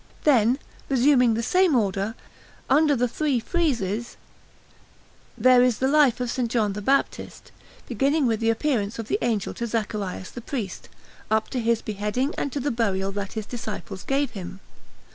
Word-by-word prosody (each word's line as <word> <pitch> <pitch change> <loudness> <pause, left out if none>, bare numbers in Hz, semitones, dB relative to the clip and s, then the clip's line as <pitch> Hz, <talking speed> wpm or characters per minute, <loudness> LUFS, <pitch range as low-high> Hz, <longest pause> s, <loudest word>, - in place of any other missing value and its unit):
Then, 250 -4 +4 0.3
resuming 250 -3 +4
the 230 - -2
same 365 +3 +3
order, 200 -1 0 0.6
under 295 +1 +4
the 245 0 +1
three 280 0 0
friezes 235 - -1 1.2
there 255 -1 +6
is 250 -3 +3
the 265 - +1
life 285 -4 +4
of 250 - -1
S. 245 - -3
John 220 -4 0
the 210 - -5
Baptist, 275 +6 -1 0.4
beginning 275 +5 +1
with 225 -3 +1
the 225 0 +1
appearing 225 -3 0
of 225 -2 -5
the - - +1
Angel 225 -5 -1
to 235 - -4
Zacharias 210 -4 -3
the 240 - -8
priest, 225 -7 -5 0.4
up 220 0 0
to 255 - -1
his 230 -1 +1
beheading 215 +7 -2
and 285 - -2
to 285 - -3
the 285 +2 -1
burial 195 -5 0
that 200 0 -5
his 220 -2 -4
disciples 215 -5 -6
gave 275 -1 0
him. 190 -2 -8
235 Hz, 165 wpm, -24 LUFS, 210-270 Hz, 1.2 s, there